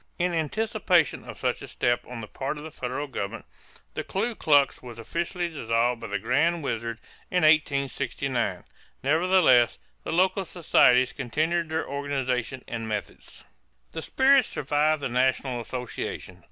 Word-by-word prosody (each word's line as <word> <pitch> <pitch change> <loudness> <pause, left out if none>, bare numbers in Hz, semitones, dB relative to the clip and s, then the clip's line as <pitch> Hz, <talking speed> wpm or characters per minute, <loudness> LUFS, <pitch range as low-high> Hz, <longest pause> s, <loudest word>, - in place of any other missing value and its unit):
In 175 0 0
anticipation 180 - +1
of - - -8
such - - -1
a - - -8
step 120 0 0
on 125 -2 -7
the 110 - -7
part 135 +6 -4
of 150 - -8
the 160 - -8
federal 130 0 -4
government, 110 -8 -5 0.5
the - - -3
Ku 225 +5 -2
Klux 145 -8 +3
was 120 -2 -10
officially 170 - -3
dissolved 120 -5 0
by 115 - -5
the 105 -1 -1
"Grand 170 - +1
Wizard" 115 -3 -3 0.3
in 180 -2 +1
1869. 140 - +1 0.4
Nevertheless, 155 -5 +4 0.3
the - - -4
local 190 +3 +2
societies 130 -7 +3
continued 155 +6 -1
their 160 +1 -2
organization 135 -3 -2
and 115 -1 -4
methods. 105 -2 -6 0.5
The 160 - -5
spirit 270 - +4
survived 150 +1 0
the - - +1
national 125 0 0
association. 125 +1 -6
140 Hz, 145 wpm, -26 LUFS, 125-170 Hz, 0.5 s, Nevertheless